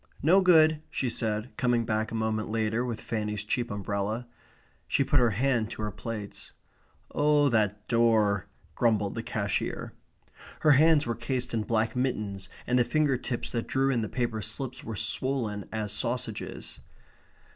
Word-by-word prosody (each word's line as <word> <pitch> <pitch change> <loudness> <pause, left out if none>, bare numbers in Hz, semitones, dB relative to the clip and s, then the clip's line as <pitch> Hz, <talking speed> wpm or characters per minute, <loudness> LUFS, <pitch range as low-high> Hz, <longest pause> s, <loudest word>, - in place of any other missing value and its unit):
"No 180 +6 +6
good," 160 -4 +5
she 130 - -1
said, 110 0 -2
coming 120 -2 +2
back 110 0 0
a - - -4
moment 110 -1 -1
later 110 +1 0
with 120 -3 -3
Fanny's 105 -2 -3
cheap 120 +3 -1
umbrella. 100 +3 -2 0.6
She 140 - +2
put 145 +1 +3
her 120 -1 +4
hand 115 +1 +1
to 110 - -6
her 105 - -2
plaits. 105 0 -7 0.6
"Oh, 145 -1 +3
that 105 -3 0
door!" 110 -4 +3 0.3
grumbled 105 -4 +1
the 115 - -3
cashier. 100 -3 -2 0.7
Her 155 - +6
hands 155 +1 +5
were 115 - -1
cased 125 +2 -3
in 115 - +1
black 110 +1 0
mittens, 105 -7 -2 0.2
and 125 +1 +2
the - - +5
finger 150 +1 +2
tips 120 -1 -3
that 115 -1 -2
drew 135 +1 +2
in 120 -3 +1
the 110 - -3
paper 120 -3 -2
slips 115 +5 -4
were 115 - -5
swollen 110 -1 -1
as 110 -2 -3
sausages. 115 -1 -3
115 Hz, 160 wpm, -28 LUFS, 105-130 Hz, 0.7 s, No